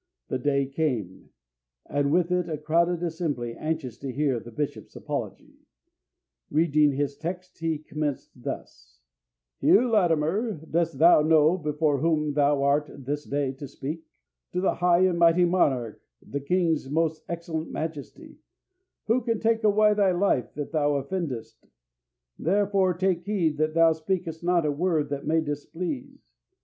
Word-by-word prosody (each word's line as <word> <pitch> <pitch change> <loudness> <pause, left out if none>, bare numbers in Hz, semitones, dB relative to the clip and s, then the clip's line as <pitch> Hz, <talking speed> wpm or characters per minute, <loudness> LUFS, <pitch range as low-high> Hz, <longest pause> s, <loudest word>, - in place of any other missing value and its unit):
The 130 - -1
day 140 +1 +1
came, 130 - -3 0.6
and 145 0 0
with 175 +1 +2
it 180 -1 0
a 155 - -2
crowded 170 +3 +1
assembly 155 -8 -2
anxious 155 -5 -4
to 135 -1 -5
hear 135 -2 0
the 115 - -11
bishop's 145 +5 -5
apology. - - -6 0.9
Reading 150 -2 +3
his 140 +1 -1
text, 180 +3 -6
he 165 -1 -1
commenced 150 -2 -4
thus: - - -8 0.6
'Hugh 245 +2 +4
Latimer, 185 +3 +2
dost 165 0 -2
thou 165 -1 +7
know 155 +1 +4
before 150 -3 0
whom 150 -1 +1
thou 145 -1 +2
art 145 +2 +2 0.2
this 145 +2 -3
day 140 -1 -1
to 135 +1 -9
speak? 150 +4 -6 0.5
To 180 - 0
the 190 - +2
high 175 0 +3
and 185 -2 +2
mighty 170 +1 +5
monarch, 135 - +1 0.3
the 140 - -3
king's 165 -2 0
most 160 +1 0
excellent 165 -1 -4
majesty, 155 -3 -7 0.7
who 235 +3 +2
can 230 -2 -1
take 225 0 +1
away 210 0 +4
thy 200 -3 +3
life 175 - 0
if 145 -1 -4
thou 145 -2 +1
offendest. 140 -5 -5 0.7
Therefore, 195 0 +2
take 185 -1 0
heed 175 -6 -1
that 155 0 0
thou 165 -1 +5
speakest 165 0 -3
not 175 -2 +2
a 150 - +1
word 155 -1 0
that 140 0 -4
may 160 +1 +3
displease. 175 - -5
160 Hz, 150 wpm, -26 LUFS, 145-180 Hz, 0.9 s, thou